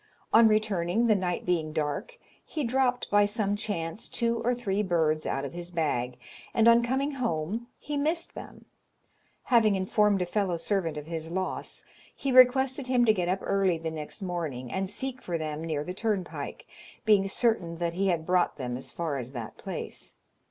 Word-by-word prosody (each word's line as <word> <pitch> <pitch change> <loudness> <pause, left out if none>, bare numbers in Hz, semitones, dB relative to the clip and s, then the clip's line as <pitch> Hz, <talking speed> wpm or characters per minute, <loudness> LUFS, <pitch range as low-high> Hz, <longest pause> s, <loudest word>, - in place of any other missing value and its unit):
On 225 0 +8
returning, 215 -1 +2
the 225 - +5
night 185 -3 -1
being 160 -4 0
dark, 155 - -2 0.3
he 305 - -4
dropped, 250 0 +1
by 205 0 +5
some 205 -1 0
chance, 185 -3 -3
two 235 0 0
or 245 +1 +1
three 205 -4 -1
birds 160 -5 +1
out 135 +1 -1
of 140 - -6
his 175 0 -6
bag, 135 -8 -1 0.4
and 225 0 +5
on 235 0 +7
coming 265 +4 0
home 225 - -2
he 295 -1 -4
missed 315 +4 0
them. - - -10 0.8
Having 225 -5 +4
informed 200 +1 +2
a - - -2
fellow 185 -1 0
servant 165 -3 -1
of 150 - -6
his 160 0 -5
loss, 185 +2 -3 0.3
he 275 - -2
requested 260 +1 +5
him 250 -2 +3
to 220 - +5
get 180 -4 -1
up 190 +1 0
early 195 -3 +2
the 160 0 -4
next 155 +4 -6
morning, 155 -9 -4
and 190 0 -1
seek 255 +4 -5
for 175 -2 -2
them 155 0 -4
near 155 -3 -2
the 180 - -5
turnpike, 205 -2 -3 0.4
being 205 -3 +5
certain 195 -6 0
that 170 0 -1
he 195 +3 0
had 170 -3 0
brought 180 0 +2
them 125 -3 -3
as 130 - -7
far 160 -5 -3
as 125 +2 -7
that 115 -5 -6
place. - - -6
190 Hz, 185 wpm, -28 LUFS, 165-230 Hz, 0.8 s, On